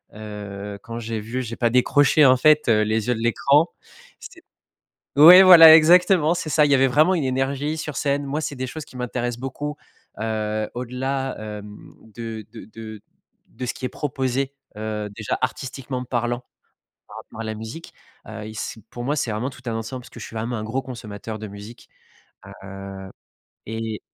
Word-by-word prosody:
heu, 105 Hz, -1 st, -8 dB
quand 115 Hz, +2 st, -8 dB
j'ai 115 Hz, -1 st, -4 dB
vu 115 Hz, +5 st, -4 dB
j'ai 115 Hz, -1 st, -6 dB
pas 120 Hz, -1 st, +1 dB
décroché, 145 Hz, +4 st, +4 dB
en 130 Hz, -1 st, +7 dB
fait, 150 Hz, +3 st, +4 dB
heu, 110 Hz, -2 st, +4 dB
les 110 Hz, +2 st, 0 dB
yeux -, -, +3 dB
de 110 Hz, -, -5 dB
l'écran, 140 Hz, +7 st, +3 dB, 0.5 s
c -, -, -12 dB, 0.7 s
ouais, 170 Hz, +6 st, +10 dB
voilà, 165 Hz, -4 st, +10 dB
exactement, 175 Hz, 0 st, +5 dB
c'est 165 Hz, -3 st, -4 dB
ça! 150 Hz, +1 st, +4 dB
Il 145 Hz, -, +1 dB
y -, -, +6 dB
avait 135 Hz, 0 st, +4 dB
vraiment 155 Hz, +8 st, +3 dB
une 165 Hz, -, -1 dB
énergie 135 Hz, +3 st, -1 dB
sur 150 Hz, -2 st, -5 dB
scène, 140 Hz, 0 st, 0 dB
moi, 145 Hz, +3 st, -2 dB
c'est 145 Hz, -, -4 dB
des 130 Hz, 0 st, -4 dB
choses 155 Hz, +4 st, -7 dB
qui -, -, -18 dB
m'intéressent 120 Hz, -1 st, -3 dB
beaucoup, 145 Hz, +3 st, -5 dB, 0.4 s
heu, 110 Hz, -1 st, -2 dB
au-delà, 130 Hz, +2 st, -3 dB
hem, 105 Hz, -1 st, -9 dB, 0.2 s
de 115 Hz, -2 st, -7 dB
de -, -, -10 dB
de 110 Hz, 0 st, -10 dB, 0.5 s
de 130 Hz, -, -6 dB
ce 125 Hz, -, -3 dB
qui -, -, -14 dB
est -, -, -2 dB
proposé, 135 Hz, -1 st, -2 dB, 0.2 s
heu, 105 Hz, -1 st, -4 dB
déjà, 105 Hz, +1 st, -4 dB
artistiquement 130 Hz, 0 st, -4 dB
parlant 120 Hz, 0 st, -2 dB, 0.6 s
par -, -, -11 dB
rapport 115 Hz, -, -10 dB
à -, -, -4 dB
la 110 Hz, 0 st, -4 dB
musique, 110 Hz, +10 st, -9 dB, 0.3 s
heu, 110 Hz, -1 st, -7 dB
il 110 Hz, -, -9 dB
c'est 110 Hz, +1 st, -6 dB
pour 120 Hz, -, -7 dB
moi, 145 Hz, +4 st, -1 dB
c'est 120 Hz, -, -1 dB
vraiment 110 Hz, +5 st, -2 dB
tout 130 Hz, -2 st, -14 dB
un 115 Hz, -, -2 dB
ensemble 115 Hz, +3 st, -5 dB
parce -, -, -14 dB
que -, -, -12 dB
je -, -, -6 dB
suis -, -, -11 dB
vraiment 115 Hz, +2 st, -3 dB
un 110 Hz, -, -4 dB
gros 120 Hz, +5 st, -2 dB
consommateur 110 Hz, -4 st, -8 dB
de 110 Hz, -, -6 dB
musique, 105 Hz, +3 st, -12 dB, 0.8 s
heu 95 Hz, 0 st, -9 dB, 0.6 s
et 110 Hz, -1 st, -5 dB
120 Hz, 190 wpm, -22 LUFS, 110-140 Hz, 0.8 s, ouais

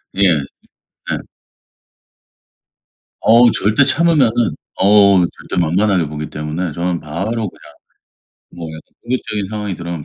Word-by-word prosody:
예. 100 Hz, -, -1 dB
예. 75 Hz, -5 st, +1 dB, 2.8 s
어우 120 Hz, +1 st, +6 dB
절대 105 Hz, +8 st, +2 dB
참으면은 150 Hz, -6 st, +3 dB, 0.4 s
어우 100 Hz, -2 st, +5 dB, 0.2 s
절대 90 Hz, -, 0 dB
만만하게 90 Hz, +1 st, +1 dB
보기 75 Hz, +1 st, -6 dB
때문에 75 Hz, +3 st, -4 dB
저는 85 Hz, 0 st, -2 dB
바로 85 Hz, +8 st, -4 dB, 0.2 s
그냥 -, -, -18 dB, 0.8 s
뭐 85 Hz, -2 st, -8 dB
약간 80 Hz, 0 st, -9 dB, 0.2 s
공격적인 110 Hz, -5 st, -3 dB
상황이 105 Hz, -3 st, -4 dB
들어오면 85 Hz, -3 st, -6 dB
95 Hz, 255 characters per minute, -17 LUFS, 85-105 Hz, 2.8 s, 어우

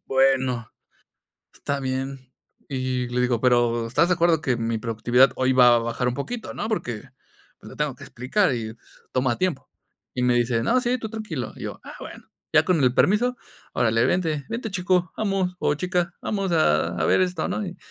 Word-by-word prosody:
bueno, 130 Hz, -3 st, +2 dB, 0.9 s
está 140 Hz, 0 st, -3 dB
bien. 130 Hz, 0 st, -4 dB, 0.4 s
Y 130 Hz, -2 st, -2 dB
le 125 Hz, +1 st, 0 dB
digo: 125 Hz, -2 st, +1 dB
"Pero, 120 Hz, -2 st, +2 dB
¿estás 145 Hz, +9 st, +2 dB
de -, -, +4 dB
acuerdo 170 Hz, -2 st, +3 dB
que 130 Hz, -5 st, +1 dB
mi 115 Hz, -1 st, -1 dB
productividad 120 Hz, +3 st, +3 dB
hoy 130 Hz, 0 st, +2 dB
va 125 Hz, -2 st, +7 dB
a -, -, +3 dB
bajar 115 Hz, +2 st, -2 dB
un 125 Hz, -, 0 dB
poquito, 225 Hz, -, -5 dB
no?, -, -, -4 dB
porque, 120 Hz, -, -3 dB, 0.6 s
pues, -, -, -12 dB
le -, -, -11 dB
tengo -, -, -1 dB
que -, -, -13 dB
explicar 135 Hz, -, 0 dB
y 110 Hz, -1 st, -5 dB, 0.4 s
toma 130 Hz, -2 st, 0 dB
tiempo". 185 Hz, -6 st, -2 dB, 0.4 s
Y 125 Hz, -, -1 dB
me 125 Hz, -1 st, +3 dB
dice: 120 Hz, -1 st, +1 dB
"No, 250 Hz, -, +3 dB
sí, 245 Hz, +1 st, 0 dB
tú 225 Hz, -2 st, -6 dB
tranquilo". 210 Hz, -, -5 dB
Y -, -, -8 dB
yo: -, -, -6 dB
"Ah, -, -, -10 dB
bueno". -, -, -10 dB, 0.3 s
Ya 155 Hz, 0 st, +5 dB
con 170 Hz, -6 st, +2 dB
el 125 Hz, -, +4 dB
permiso: 245 Hz, +5 st, +3 dB, 0.4 s
"Órale, 115 Hz, 0 st, +2 dB
vente, 160 Hz, -6 st, 0 dB
vente, 230 Hz, -1 st, -4 dB
chico 180 Hz, -1 st, 0 dB
vamos, 195 Hz, -4 st, 0 dB
o 145 Hz, -, +1 dB
chica. 180 Hz, +2 st, -1 dB
Vamos 195 Hz, -3 st, -2 dB
a 85 Hz, -, +2 dB
a 80 Hz, -, +1 dB
ver -, -, +4 dB
esto, 180 Hz, -3 st, 0 dB
¿no?, 215 Hz, -, -2 dB
y 180 Hz, -1 st, -7 dB
135 Hz, 195 wpm, -24 LUFS, 120-180 Hz, 0.9 s, va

